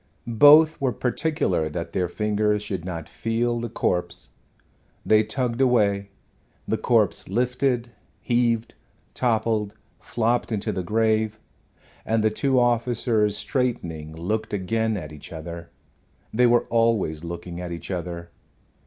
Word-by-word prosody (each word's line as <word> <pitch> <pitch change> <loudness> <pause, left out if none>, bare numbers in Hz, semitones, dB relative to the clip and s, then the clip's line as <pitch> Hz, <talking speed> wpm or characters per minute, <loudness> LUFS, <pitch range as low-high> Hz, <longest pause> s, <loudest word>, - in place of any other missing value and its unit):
Both 145 +7 +6
were 135 -2 +2
particular 125 - 0
that 85 +2 -5
their 90 -1 0
fingers 105 +2 0
should 95 -5 -4
not 85 -3 -5
feel 120 +1 -1
the 120 0 -4
corpse. 90 -5 -2 0.8
They 110 0 +5
tugged 115 +3 -2
away; 100 -6 +2 0.6
the - - 0
corpse - - +1
lifted, 125 +2 0 0.3
heaved, 120 -2 0 0.4
toppled, 110 -3 0 0.2
flopped 120 +1 -1
into 110 0 -1
the 95 -2 -2
grave, 110 +2 +1 0.6
and 110 -1 0
the 110 - +3
two 130 +4 +1
officers, 120 -3 +1
straightening, 85 - -2
looked 105 +7 -3
again 110 +3 0
at 75 -5 -7
each 75 - -11
other 85 +1 -7 0.6
they 125 +2 +4
were 120 0 +3
always 115 -9 +1
looking 85 +1 -6
at 90 -1 -5
each 85 +2 -6
other. 85 -1 -5
110 Hz, 125 wpm, -24 LUFS, 90-120 Hz, 0.8 s, Both